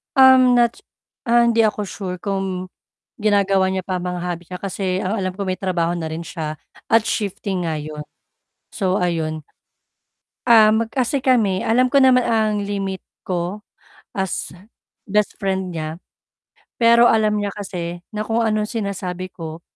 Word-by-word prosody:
Um, 260 -2 +7
not, 235 -1 +3 0.5
ah, 235 0 +4
hindi 230 -1 +3
ako 210 -1 0
sure 185 -2 -5
kung 190 -1 -3 0.5
ginagawa 195 -2 +2
niya 190 - -1
pa 185 - -1
ang 180 0 -3
mga 180 - -4
hobby 175 -1 -4
niya 180 - -5
kasi 190 -1 -2
ang 195 +3 -1
alam 185 -3 -2
ko 195 +1 -5
may 185 - 0
trabaho 175 -3 -1
na 160 -2 -4
rin 160 - -4
siya 155 -3 -5 0.3
at 225 -1 +5
shifting 195 -3 -2
nga 160 -2 -2
yun, 150 0 -7 0.7
so 190 -2 0
ayun. 160 -3 -2 1.0
Um, 220 -1 +5
kasi 260 +2 -1
kami 225 -8 +2
alam 250 +3 +3
ko 275 +2 +3
naman 255 -1 +5
ang 215 -2 +1
limit 195 -2 -4 0.2
ko 180 +3 -3 0.5
as 190 -4 -3 0.5
best 210 0 0
friend 190 -2 -2
niya 155 +1 -5 0.8
pero 235 +1 +6
alam 215 -2 +3
niya 205 -1 -2
kasi 175 -4 -5
na 215 0 -4
kung 225 +1 0
anong 215 -2 +1
sinasabi 185 -4 -4
ko, 165 -1 -8
195 Hz, 155 wpm, -21 LUFS, 180-220 Hz, 1.0 s, Um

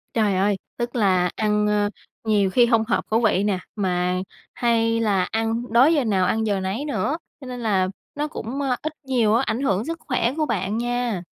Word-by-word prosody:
Trời 210 -4 +2
ơi, 200 +2 +2 0.2
tức 240 0 -3
là 185 -5 +3
ăn, 210 -1 +1
ơ, 205 0 +2 0.3
nhiều 210 -3 +2
khi 240 +5 +4
hông 230 -2 +3
hợp 240 - 0
khẩu 220 - +3
vị 205 -4 +2
nè, 200 -3 0 0.2
mà 180 -3 0 0.4
hay 230 -1 +1
là 205 -5 +2
ăn 225 +1 -2
đói 260 +7 +6
giờ 290 -4 +2
nào 195 -5 +2
ăn 220 +4 +1
giờ 200 -2 0
nấy 190 +9 -3
nữa, 295 +1 -1 0.2
cho 265 - -9
nên 250 -1 -6
là 200 -5 +1 0.3
nó 295 +1 -1
cũng, 275 -2 -5
ơ, 265 -3 +1
ít 310 0 -3
nhiều 240 -5 +2
á, 235 +4 +3
ảnh 235 - -1
hưởng 205 -6 +1
sức 330 +2 -3
khỏe 250 -2 +1
của 310 - +1
bạn 210 -4 -1
nha. 240 -4 -1
225 Hz, 210 wpm, -23 LUFS, 200-245 Hz, 0.4 s, đói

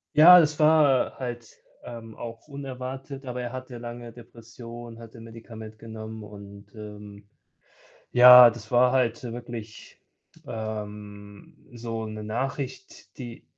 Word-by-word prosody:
Ja, 175 +4 +10
das 150 -1 +1
war, 150 -4 +4
äh, - - -20
halt, 120 -3 -7 0.3
ähm, 115 -2 -10
auch 115 +2 -9
unerwartet, 135 -1 -7
aber 125 -1 -5
er 120 0 -5
hatte 130 -1 -8
lange 120 0 -8
Depressionen, 115 0 -12
hatte 115 0 -12
Medikament 115 -1 -11
genommen 110 -1 -9
und, 100 0 -12
ähm 105 -1 -11 0.9
ja, 125 0 +10
das 120 +1 -11
war 125 +1 +4
halt 120 -3 +1
wirklich, 115 -2 -9 0.5
ähm, 105 -2 -8 0.2
so 115 -1 -5
'ne 110 0 -7
Nachricht, 130 -2 -6
die 120 -3 -9
115 Hz, 125 wpm, -26 LUFS, 110-125 Hz, 0.9 s, Ja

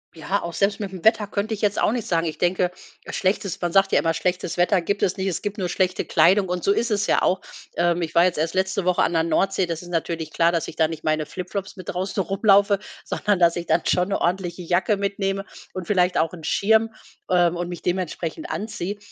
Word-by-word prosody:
Ja, 165 +6 -2
auch 170 - -5
selbst 200 +3 +1
mit 205 -2 -3
'm 185 -3 -9
Wetter 220 -1 +3
könnte 205 +2 -2
ich 210 - -5
jetzt 205 -2 +1
auch - - +3
nicht 235 -2 -3
sagen. 165 -1 +1
Ich 155 - -4
denke, 180 0 +1 0.4
schlechtes 190 -1 -1
man 175 -1 -1
sagt 195 0 +4
ja - - +4
immer, 165 -1 +1
schlechtes 180 +1 -2
Wetter 180 +1 +3
gibt 200 +4 -2
es 190 - +1
nicht, 190 0 -2
es 180 - -2
gibt 205 0 -4
nur 185 -3 -1
schlechte 185 +1 0
Kleidung 190 +3 +4
und 180 -1 -3
so - - +3
ist 235 +3 0
es 205 -1 +1
ja - - +3
auch. 185 - +1 0.3
Ähm, 175 0 +1
ich 165 -1 -4
war 170 - +6
jetzt 180 -2 +1
erst 160 +2 -1
letzte 190 0 0
Woche 180 -1 +3
an - - +1
der 165 -1 +2
Nordsee, 190 +4 +1
das 165 -2 -4
ist 175 - -11
natürlich 165 -2 -3
klar, 165 +1 +3
dass 170 - -1
ich - - -11
da 160 - +3
nicht 160 0 -7
meine 155 0 0
Flip-Flops 195 +4 -6
mit 185 -4 -9
draußen 190 +2 -2
rumlaufe, 200 +1 +3 0.2
sondern 205 -1 0
dass 170 -1 +4
ich 170 - -4
dann 160 +2 +3
schon 180 0 +2
'ne 195 - 0
ordentliche 180 0 -1
Jacke 180 +5 +1
mitnehme 195 0 -2 0.3
und 185 -2 -6
vielleicht 180 -3 +2
auch 160 0 +2
'nen 170 -3 -11
Schirm, 220 +2 +3 0.4
ähm, 175 -1 +3
und 175 0 -3
mich 175 -1 -7
dementsprechend 180 - -3
anziehe. 205 - -4
185 Hz, 240 wpm, -23 LUFS, 170-200 Hz, 0.4 s, war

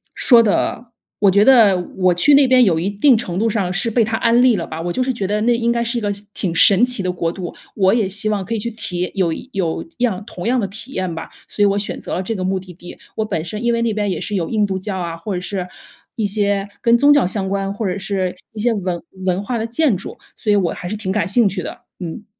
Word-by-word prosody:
说 240 -3 +6
得， 225 +2 -1 0.3
我 200 - +5
觉 200 +2 +4
得 225 -8 +6 0.2
我 185 -1 +3
去 285 +11 +4
那 280 -1 +6
边 255 0 +5
有 165 -4 +2
一 190 +4 -1
定 230 +6 +4
程 180 -6 -4
度 225 - +2
上 195 -4 -1
是 230 +5 0
被 230 0 +3
他 225 +1 -1
安 235 +1 +3
利 250 -4 +5
了 170 - -3
吧。 160 +1 -6
我 175 0 -3
就 255 - 0
是 260 - -1
觉 200 -5 -3
得 210 +1 -1
那 235 +2 +3
应 235 0 +1
该 235 0 0
是 235 +1 -1
一 235 - -2
个 205 -1 -1 0.2
挺 170 -4 -3
神 200 +6 +5
奇 250 -6 -1
的 180 - 0
国 170 -2 -2
度， 175 -1 -6 0.2
我 190 0 +3
也 220 -5 +2
希 205 +2 +1
望 205 -2 -1
可 230 - -3
以 - - -2
去 235 +3 -3
体 180 -5 -3
有 180 -4 +1 0.2
有 175 -5 -2
样 215 -5 0
同 180 -1 -6
样 250 +1 +2
的 205 - 0
体 225 +7 -8
验 185 -2 -2
吧， 160 - -7 0.2
所 205 - -4
以 - - +6
我 200 0 +1
选 205 - -3
择 - - -5
了 185 - -2
这 225 - -3
个 185 - -3
目 190 +1 0
的 185 -1 -12
地。 175 +1 -12 0.2
我 220 - 0
本 160 -7 -2
身 210 +6 -5
因 235 0 +2
为 235 - 0
那 230 -2 0
边 205 -1 -1
也 - - -3
是 210 - -3
有 170 -4 -1
印 215 -2 +1
度 190 -1 -3
教 190 0 -4
啊， 170 -2 -4
或 190 +4 -4
者 180 - -3
是 185 -1 -4 0.5
一 220 - -1
些 200 -1 0
跟 235 0 +4
宗 285 +4 +5
教 285 -11 +3
相 190 0 -2
关， 195 0 -1
或 215 +1 -4
者 180 - -2
是 190 -2 -2 0.2
一 215 - -8
些 235 +1 +2
文 180 -4 -3 0.2
文 185 0 +1
化 235 +3 -2
的 225 - -2
建 245 -1 +2
筑， 190 - -8 0.2
所 210 - -1
以 - - +4
我 185 -4 +1
还 175 - -7
是 215 - -3
挺 190 -3 -3
感 195 -4 0
兴 230 +2 +4
趣 185 -1 -3
的， - - -7 0.2
嗯。 185 +5 -7
205 Hz, 305 characters per minute, -19 LUFS, 185-230 Hz, 0.5 s, 说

